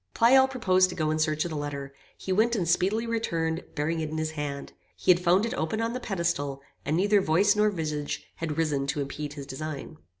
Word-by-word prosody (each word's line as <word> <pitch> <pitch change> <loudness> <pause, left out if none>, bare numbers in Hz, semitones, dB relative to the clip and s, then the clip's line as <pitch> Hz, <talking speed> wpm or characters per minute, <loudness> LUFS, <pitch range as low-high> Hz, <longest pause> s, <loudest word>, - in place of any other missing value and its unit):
Pleyel 265 +3 +6
proposed 185 -8 +3
to - - -6
go 155 -2 0
in 155 - 0
search 155 0 +1
of 170 - -4
the - - -4
letter. 140 -2 -5 0.2
He 190 - -2
went 230 +4 +3
and 180 -6 -1
speedily 195 +7 +2
returned, 170 -8 -1
bearing 160 +2 -1
it 155 -1 -2
in 155 - -4
his 155 0 -1
hand. 145 -2 -5 0.2
He 185 - +3
had 175 - +4
found 180 +4 +3
it 230 - -3
open 215 -2 -2
on 230 +1 -1
the 250 - -3
pedestal; 170 - -2 0.2
and 155 +3 0
neither 205 +2 +4
voice 190 +5 +3
nor 210 0 +4
visage 155 -6 -3
had 160 -2 -3
risen 145 -4 0
to 145 +1 -1
impede 145 +1 -5
his 140 -2 -7
design. 155 +2 -6
165 Hz, 225 wpm, -27 LUFS, 150-200 Hz, 0.2 s, Pleyel